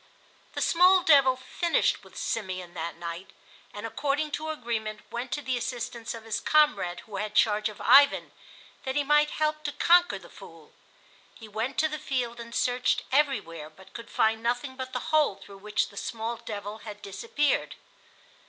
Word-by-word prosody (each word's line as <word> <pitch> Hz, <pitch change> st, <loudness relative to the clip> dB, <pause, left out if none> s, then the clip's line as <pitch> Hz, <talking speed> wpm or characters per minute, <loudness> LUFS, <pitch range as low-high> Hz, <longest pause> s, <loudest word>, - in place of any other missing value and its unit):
The -, -, -4 dB
small 365 Hz, +2 st, +5 dB
devil 275 Hz, -4 st, +6 dB
finished 330 Hz, +6 st, 0 dB
with -, -, -15 dB
Simeon 185 Hz, -5 st, -3 dB
that 170 Hz, 0 st, -4 dB
night, 170 Hz, +2 st, -6 dB, 0.4 s
and 205 Hz, +1 st, -7 dB
according 290 Hz, +6 st, -1 dB
to 315 Hz, +2 st, -3 dB
agreement 225 Hz, -7 st, -3 dB
went 240 Hz, +2 st, -4 dB
to 295 Hz, -, -3 dB
the 255 Hz, -2 st, -1 dB
assistance 235 Hz, -1 st, -4 dB
of 225 Hz, -, -10 dB
his 225 Hz, -1 st, -2 dB
comrade 295 Hz, -13 st, +2 dB
who 210 Hz, -3 st, -8 dB
had 210 Hz, +1 st, -4 dB
charge 210 Hz, 0 st, +3 dB
of 210 Hz, -, -12 dB
Ivan, 280 Hz, +1 st, +5 dB, 0.5 s
that 265 Hz, 0 st, -3 dB
he 290 Hz, -, +2 dB
might 295 Hz, +1 st, +4 dB
help 305 Hz, 0 st, -1 dB
to 290 Hz, -, -1 dB
conquer 350 Hz, +4 st, +4 dB
the -, -, -13 dB
Fool. -, -, -15 dB, 0.6 s
He 225 Hz, -, -12 dB
went 220 Hz, +5 st, -3 dB
to 315 Hz, -, +3 dB
the 305 Hz, 0 st, -5 dB
field 245 Hz, -4 st, -2 dB
and 235 Hz, 0 st, -8 dB
searched 250 Hz, 0 st, +1 dB
everywhere, 260 Hz, -, 0 dB
but 190 Hz, +4 st, -18 dB
could 230 Hz, 0 st, -9 dB
find 220 Hz, 0 st, +1 dB
nothing 245 Hz, +3 st, -2 dB
but 260 Hz, 0 st, -6 dB
the 250 Hz, +4 st, -4 dB
hole 300 Hz, -9 st, +4 dB
through 200 Hz, 0 st, -14 dB
which 210 Hz, +1 st, -1 dB
the 200 Hz, -, -16 dB
small 230 Hz, +2 st, -3 dB
devil 210 Hz, -2 st, -6 dB
had 210 Hz, -1 st, -10 dB
disappeared. 295 Hz, -, -1 dB
235 Hz, 175 wpm, -27 LUFS, 210-290 Hz, 0.6 s, devil